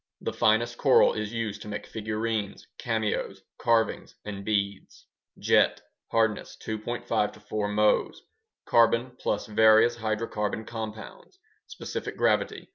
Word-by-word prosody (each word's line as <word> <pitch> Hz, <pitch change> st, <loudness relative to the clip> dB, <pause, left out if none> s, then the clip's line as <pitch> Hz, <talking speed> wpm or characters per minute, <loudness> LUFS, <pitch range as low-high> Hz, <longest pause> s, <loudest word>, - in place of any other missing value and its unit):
The -, -, -4 dB
finest 115 Hz, +2 st, +2 dB
coral 135 Hz, -3 st, +5 dB
is 110 Hz, -1 st, -4 dB
used 110 Hz, -3 st, -3 dB
to -, -, -9 dB
make 105 Hz, 0 st, -5 dB
figurines, 110 Hz, -1 st, -3 dB
cameos, 110 Hz, -4 st, -2 dB, 0.2 s
carvings, 115 Hz, -2 st, +1 dB
and 100 Hz, -1 st, -6 dB
beads. 100 Hz, -2 st, -2 dB, 0.3 s
Jet -, -, +3 dB, 0.3 s
(hardness: 110 Hz, -2 st, 0 dB
2.5 110 Hz, -1 st, -2 dB
4 105 Hz, -1 st, -1 dB
Mohs) 105 Hz, +1 st, +2 dB, 0.5 s
Carbon 115 Hz, +2 st, +3 dB
plus 105 Hz, -, -1 dB
various 110 Hz, +2 st, +5 dB
hydrocarbon 110 Hz, -1 st, -2 dB
compounds 110 Hz, -, -8 dB, 0.3 s
Specific -, -, -6 dB
gravity: -, -, +1 dB
1. -, -, -21 dB
110 Hz, 120 wpm, -27 LUFS, 105-115 Hz, 0.5 s, coral